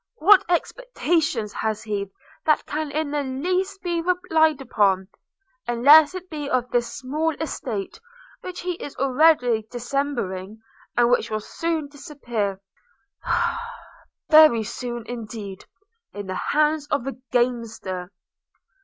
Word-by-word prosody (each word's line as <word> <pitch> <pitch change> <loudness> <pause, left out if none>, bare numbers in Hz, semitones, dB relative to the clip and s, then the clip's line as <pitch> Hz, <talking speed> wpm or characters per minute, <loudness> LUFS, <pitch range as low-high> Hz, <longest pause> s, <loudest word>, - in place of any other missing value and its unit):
What 405 +2 +6
expectations 330 - 0
has 220 -1 -2
he 200 -2 -3 0.4
that 305 - +3
can 305 0 -3
in 300 0 -2
the 295 0 0
least 365 +9 -2
be 345 -2 -1
relied 320 -4 +2
upon, 200 -7 +1 0.6
unless 285 +8 +6
it 370 0 -7
be 295 -4 -5
of 250 -3 0
this 240 -1 0
small 300 +4 -2
estate, 260 -10 -5 0.4
which 365 -1 -7
he 360 - -2
is 285 - -7
already 255 -4 +3
dismembering, 240 -6 -3 0.4
and 240 0 +4
which 240 -1 +2
will 215 - -1
soon 320 +6 -3
disappear 240 -9 -4 0.3
– - - -44
ah! 470 - 0 0.7
very 305 -8 +7
soon 240 +1 -5
indeed, 215 -4 -7 0.5
in 205 0 -6
the 185 - -4
hands 300 +7 +1
of 280 -5 0
a 270 - -2 0.2
gamester.' 225 -7 -1
270 Hz, 125 wpm, -23 LUFS, 225-315 Hz, 0.7 s, very